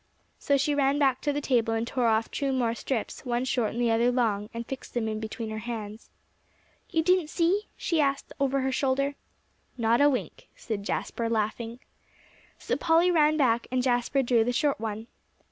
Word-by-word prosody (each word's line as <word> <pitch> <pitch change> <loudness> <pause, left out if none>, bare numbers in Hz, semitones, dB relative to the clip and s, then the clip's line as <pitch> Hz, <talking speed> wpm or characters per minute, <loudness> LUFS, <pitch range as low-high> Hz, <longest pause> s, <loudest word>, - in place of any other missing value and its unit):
So 280 -1 +2
she 285 +2 +1
ran 280 0 +2
back 270 -3 +2
to 290 - 0
the 290 +1 -2
table 235 -5 +1
and 225 +1 -1
tore 245 0 0
off 220 0 +1
two 280 -2 -1
more 245 -3 +1
strips, 235 -1 -4
one 245 0 -1
short 245 -4 0
and 235 - -4
the 240 -1 +2
other 235 +2 +3
long, 215 -4 0
and 235 0 -5
fixed 265 0 -8
them 230 -2 0
in 215 0 -2
between 220 0 -5
her 220 - -4
hands. 220 -1 -6 0.8
"You 325 -2 +1
didn't 360 -2 +2
see?" 365 +6 +1
she 330 -3 +1
asked 275 -1 -1
over 275 0 +1
her 265 0 0
shoulder. 275 +1 0 0.6
"Not 230 +2 +2
a 290 - +6
wink," 260 - -4
said 215 -4 -4
Jasper, 230 +1 -2
laughing. 225 +2 -2 0.8
So - - -2
Polly 335 +2 +3
ran 310 -2 +4
back, 240 -5 +2
and 255 0 0
Jasper 250 +2 +1
drew 240 -2 +3
the 245 - 0
short 285 +1 +1
one. 220 0 -4
250 Hz, 195 wpm, -27 LUFS, 230-280 Hz, 0.8 s, a